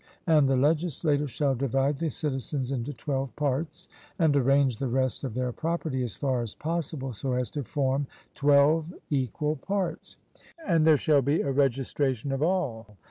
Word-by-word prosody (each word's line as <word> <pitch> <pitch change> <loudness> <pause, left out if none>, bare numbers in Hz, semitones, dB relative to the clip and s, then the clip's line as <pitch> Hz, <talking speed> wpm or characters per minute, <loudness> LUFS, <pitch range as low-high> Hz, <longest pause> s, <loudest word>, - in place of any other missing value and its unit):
And 150 -5 +4
the 135 - +3
legislator 150 0 +1
shall 140 +1 0
divide 135 +2 0
the 165 - 0
citizens 135 -2 -3
into 130 +1 -2
twelve 135 -3 -3
parts, 150 +4 -2 0.3
and 160 -5 +3
arrange 135 -2 +3
the 135 - -2
rest 130 +2 0
of 125 -5 -4
their 125 0 -1
property, 160 -2 -2
as 120 -5 -3
far 130 -3 0
as 115 -3 -6
possible, 155 -5 -3
so 130 +4 -3
as 125 -2 -1
to 145 - -3
form 135 +1 -1 0.3
twelve 145 +3 +3 0.2
equal 145 +3 -1
parts; 195 +4 -3 0.5
and 165 -4 +3
there 155 -2 +7
shall 145 0 +3
be 140 +5 +1
a 140 - -1
registration 135 -1 0
of 135 +1 -2
all. 125 - -1
140 Hz, 165 wpm, -27 LUFS, 130-155 Hz, 0.5 s, there